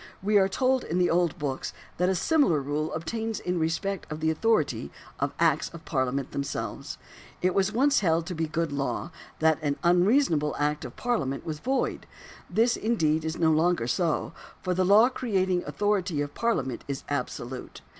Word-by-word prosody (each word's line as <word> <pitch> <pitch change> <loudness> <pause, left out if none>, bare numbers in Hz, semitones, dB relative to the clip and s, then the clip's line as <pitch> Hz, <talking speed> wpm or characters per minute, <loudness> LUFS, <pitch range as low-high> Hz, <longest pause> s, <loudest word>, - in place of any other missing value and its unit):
We 205 +1 +4
are 190 - +4
told 260 +6 +1
in 170 - -2
the 180 -1 +3
old 175 -2 +2
books 140 -3 -3 0.2
that 180 +1 +2
a 190 - +1
similar 275 - +3
rule 145 +3 -2
obtains 220 +7 -3
in 180 -1 -2
respect 165 +3 -2
of 155 - -4
the 160 0 +1
authority 155 - +1 0.3
of 140 0 0
acts 160 -3 +2
of 165 -1 -11
Parliament 130 -1 -1
themselves. 140 0 -4 0.5
It 185 0 +3
was 195 0 +2
once 275 +6 +3
held 165 -4 +1
to 180 - -4
be 160 -1 -1
good 165 0 -1
law, 140 +4 -2 0.3
that 160 -1 +3
an 145 -2 -1
unreasonable 175 - +3
act 150 0 0
of 125 - -8
Parliament 150 - -1
was 155 -2 -4
void. 265 +7 -1 0.4
This, 235 +2 +3
indeed, 160 -9 +1
is 160 0 -3
no 160 -1 +3
longer 160 -4 +2
so; 155 +6 0 0.3
for 185 - 0
the 185 +1 +1
law 205 +5 +6
creating 190 -8 0
authority 200 -6 0
of 145 0 -4
Parliament 225 - -1
is 140 -1 -4
absolute. 130 -2 -4
165 Hz, 175 wpm, -27 LUFS, 150-200 Hz, 0.5 s, law